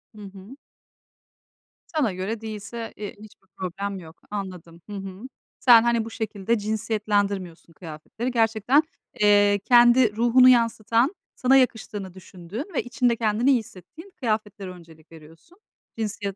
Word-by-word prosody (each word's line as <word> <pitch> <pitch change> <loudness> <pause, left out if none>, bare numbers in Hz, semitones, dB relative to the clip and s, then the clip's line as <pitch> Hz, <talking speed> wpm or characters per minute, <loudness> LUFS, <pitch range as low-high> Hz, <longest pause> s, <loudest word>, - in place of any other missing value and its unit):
Hı 210 - -12
hı. 195 +5 -12 1.4
Sana 245 -11 +1
göre 205 +5 -4
değilse, 220 +1 -7
eee, 210 0 -7
hiçbir 205 -2 -16
problem 195 +2 -4
yok. 160 -1 -14
Anladım. 180 -4 -7
Hı - - -7
hı. 195 0 -8 0.4
Sen 235 -3 +7
hani 235 -2 +1
bu - - -7
şekilde 220 0 -2
cinsiyetlendirmiyorsun 205 -5 -2
kıyafetleri. 170 +10 -6
Gerçekten, 230 +5 +2 0.4
eee, 205 -1 +4
kendi 240 -2 +5
ruhunu 245 +2 +5
yansıtan, 230 - +2 0.2
sana 260 +1 +3
yakıştığını 215 -6 -1
düşündüğün 190 - -8
ve - - -1
içinde 245 -1 0
kendini 225 +3 +1
iyi 250 - +4
hissettiğin 230 - -13
kıyafetlere 215 -4 -3
öncelik 165 -2 -16
veriyorsun. 165 - -17 0.4
Cinsiyet, 205 -3 -4
210 Hz, 130 wpm, -24 LUFS, 190-235 Hz, 1.4 s, Sen